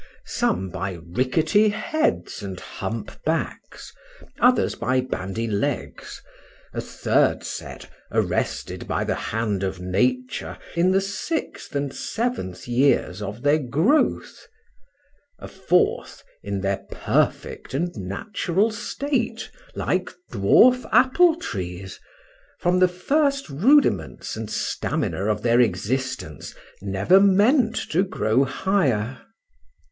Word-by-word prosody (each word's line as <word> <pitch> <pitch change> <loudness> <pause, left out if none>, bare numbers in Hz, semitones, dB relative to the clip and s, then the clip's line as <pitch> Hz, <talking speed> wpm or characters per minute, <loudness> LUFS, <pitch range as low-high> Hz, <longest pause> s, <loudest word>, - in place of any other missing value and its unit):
—some 95 +1 -1
by 95 +1 -3 0.2
rickety 155 - +2
heads 220 - -1
and 95 -2 -6
hump 110 -2 -5
backs;—others 255 - -1
by 125 +2 0
bandy 115 -3 -3
legs;—a 105 -2 -5
third - - +1
set - - -7 0.2
arrested - - -1
by - - -1
the - - -1
hand 110 -3 -2
of 95 -1 -3
Nature 125 +8 -1 0.2
in 170 +2 +3
the 190 +1 +4
sixth 200 - -4
and 140 -1 -1
seventh 225 - -3
years 120 -6 +2
of 105 +3 -6
their 145 +2 +4
growth;—a 290 - -3
fourth, 180 -2 0 0.2
in 100 0 -3
their 95 0 -1
perfect - - -1
and 175 +5 -1
natural 175 - -1
state 235 +1 -3 0.2
like - - -1 0.2
dwarf 250 0 +5
apple 260 +8 +5
trees; 95 - -6 0.6
from 180 +1 +1
the 185 - +6
first 275 - 0
rudiments 180 - +2
and 110 -1 -5
stamina 95 - -2
of 105 0 -1
their 120 0 +4
existence, 115 - -2 0.3
never 100 - +3
meant 220 +5 +4
to 170 - 0
grow 130 - +1
higher. 130 - 0
140 Hz, 105 wpm, -23 LUFS, -, 0.6 s, the